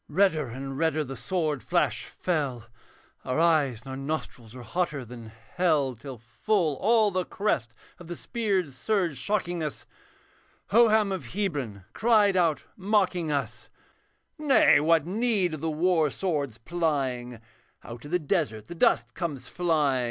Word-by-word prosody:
Redder 160 -3 +2
and 135 +3 -6
redder 160 -1 +1
the 135 -1 -7
sword 155 -7 -2
flash - - 0
fell. 140 -10 -2 0.6
Our 130 +4 -1
eyes 150 -8 +3
and 130 - -16
our - - -4
nostrils 135 -5 -5
were 125 - -9
hotter 145 +1 -2
than 120 -1 -10
hell; 130 +6 0
Till 130 +3 -9
full 155 - -1
all 215 - +3
the 185 -1 0
crest 130 - -2 0.2
of 175 - -11
the 175 - -5
spear 205 -6 -1
surge 175 - -1
shocking 175 - -1
us, 150 -2 -4 0.9
Hoham 220 -2 +5
of 190 - -5
Hebron 140 - -3
cried 215 -4 +3
out 170 -4 +2
mocking 185 -5 +1
us, 140 -1 -3 0.7
'Nay, 290 -3 +5
what 160 0 +3
need 200 -2 0
of 155 - -6
the 160 - -1
war 160 0 +2
sword's 145 - -2
plying, 130 -5 -2 0.4
Out 120 0 -9
of 145 - -9
the 180 - +2
desert 145 - -2
the - - -5
dust 120 -8 +2
comes 145 -8 -4
flying. 155 -7 +1
155 Hz, 150 wpm, -27 LUFS, 130-185 Hz, 0.9 s, Hoham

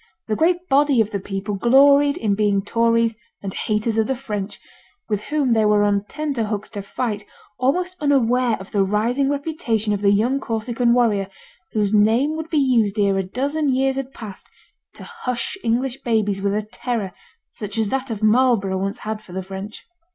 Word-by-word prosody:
The 215 - 0
great 350 +6 +1
body 280 -3 +3
of 220 -1 +2
the 200 - -2
people 195 +1 -4
gloried 280 +6 +5
in 210 -3 0
being 200 -1 +1
Tories 230 +1 +2 0.3
and 195 -1 -4
haters 215 +1 -1
of 220 - +2
the 265 - 0
French, 210 -6 -5 0.5
with 210 -2 -2
whom 285 -5 +1
they 220 -1 +3
were 210 -1 +4
on 200 0 +1
tenter 280 -3 -2
hooks 210 0 -4
to 205 -3 -5
fight, 210 +1 -3 0.4
almost 360 +8 0
unaware 250 -5 +2
of 190 - -11
the 200 -2 +2
rising 230 +8 +1
reputation 280 -8 -1
of 205 - -2
the 200 - +4
young 230 +7 +2
Corsican 235 0 0
warrior, 215 -5 +2 0.5
whose 210 -1 0
name 225 +9 +3
would 320 0 -5
be 320 - 0
used 235 -7 +2
ere 200 -2 +2
a - - 0
dozen 280 +9 -1
years 265 +1 +1
had 270 -1 -4
passed 215 -7 -9 0.5
to - - -10
hush 250 - -3
English 245 +3 0
babies 210 -5 0
with 200 0 0
a 210 - -1
terror 215 -2 -4 0.4
such 210 0 -6
as 220 -2 +1
that 270 +2 -2
of 220 -2 -4
Marlborough 215 -4 +3
once 195 +1 -2
had 215 0 -3
for 180 - -14
the 190 0 -3
French. 195 +3 -8
225 Hz, 190 wpm, -21 LUFS, 205-265 Hz, 0.5 s, gloried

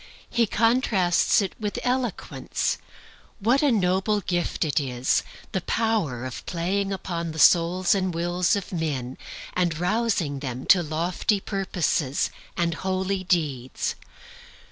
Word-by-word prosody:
He 235 -2 +2
contrasts 215 -5 +3
it 195 - -4
with 210 -2 -3
eloquence. 250 -4 -1 0.6
And 200 - -14
what 255 +4 +4
a 290 -3 +4
noble 195 0 +2
gift 175 -3 -1
it 150 - +1
is, 125 -3 +1 0.3
the 190 - -1
power 200 - 0
of 130 - -6
playing 195 +3 -1
upon 170 -4 -3
the - - -8
souls 175 +4 +5
and 190 -2 0
wills 175 +2 +1
of 200 -2 -4
men, 140 -7 -3 0.3
and 175 -3 0
rousing 180 -6 0
them 130 -2 -5
to 185 - +7
lofty 170 +6 0
purposes 180 -8 -1 0.3
and 170 -1 +1
holy 190 +2 -1
deeds! 145 -9 -1
180 Hz, 130 wpm, -25 LUFS, 160-200 Hz, 0.6 s, to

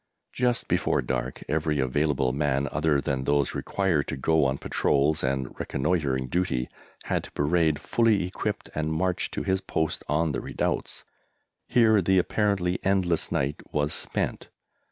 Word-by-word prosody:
Just 120 -1 0
before - - +1
dark - - -3
every 75 -1 0
available 65 0 +1
man 70 -1 0
other 75 -1 +2
than 65 -2 -2
those 70 -2 +1
required 90 -7 0
to - - -3
go 80 +2 +2
on 65 0 +1
patrols 70 +3 +1
and 65 -1 -1
reconnoitring 70 -3 0
duty 65 -5 -1 0.3
had - - -1
to - - -13
parade 80 +1 +2
fully 110 +3 +2
equipped 90 - -4
and 80 0 -1
march 90 +3 0
to - - -4
his 95 -1 0
post 80 -4 -2
on 80 +2 +1
the 65 - -3
redoubts. - - -3 0.6
Here 110 -4 +4
the 95 +2 +3
apparently 95 -1 +1
endless 95 -4 +1
night 70 +2 -1
was 75 0 0
spent. - - -2
75 Hz, 150 wpm, -26 LUFS, 70-90 Hz, 0.6 s, Here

